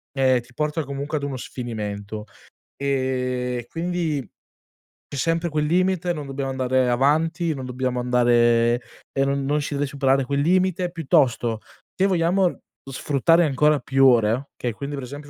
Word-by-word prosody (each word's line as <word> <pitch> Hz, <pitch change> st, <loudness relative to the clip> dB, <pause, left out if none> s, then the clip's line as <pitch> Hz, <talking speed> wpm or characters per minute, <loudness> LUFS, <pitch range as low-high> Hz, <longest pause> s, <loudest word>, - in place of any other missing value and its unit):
ehm, 130 Hz, -2 st, +3 dB
ti 120 Hz, +1 st, -21 dB
porta 150 Hz, +4 st, -1 dB
comunque 140 Hz, +2 st, -4 dB
ad 145 Hz, -, -5 dB
uno 140 Hz, -1 st, -3 dB
sfinimento. 105 Hz, -4 st, -6 dB, 0.5 s
Ehm, 125 Hz, -2 st, -1 dB
quindi 165 Hz, -6 st, -2 dB, 0.8 s
c'è -, -, -8 dB
sempre 165 Hz, +5 st, 0 dB
quel 150 Hz, 0 st, 0 dB
limite, 180 Hz, +2 st, +1 dB
non 150 Hz, -4 st, -4 dB
dobbiamo 135 Hz, 0 st, -3 dB
andare 130 Hz, -1 st, +1 dB
avanti, 160 Hz, +6 st, +1 dB
non 135 Hz, -3 st, -6 dB
dobbiamo 125 Hz, 0 st, -2 dB
andare, 120 Hz, -1 st, +3 dB, 0.3 s
e 135 Hz, -, +1 dB
non 140 Hz, 0 st, -1 dB
non 150 Hz, +2 st, +1 dB
si 145 Hz, -, -4 dB
deve 145 Hz, 0 st, 0 dB
superare 135 Hz, -1 st, +1 dB
quel 140 Hz, +2 st, 0 dB
limite; 180 Hz, +2 st, +1 dB
piuttosto, 130 Hz, -9 st, +1 dB, 0.3 s
se 190 Hz, -, +2 dB
vogliamo 180 Hz, 0 st, +1 dB, 0.3 s
sfruttare 150 Hz, +5 st, +2 dB
ancora 150 Hz, +1 st, +3 dB
più 135 Hz, +1 st, +2 dB
ore, 120 Hz, +1 st, +3 dB
okay, 120 Hz, -, -2 dB
quindi 140 Hz, +5 st, -5 dB
per 140 Hz, -, -6 dB
esempio 145 Hz, +3 st, -9 dB
140 Hz, 155 wpm, -23 LUFS, 125-155 Hz, 0.8 s, ehm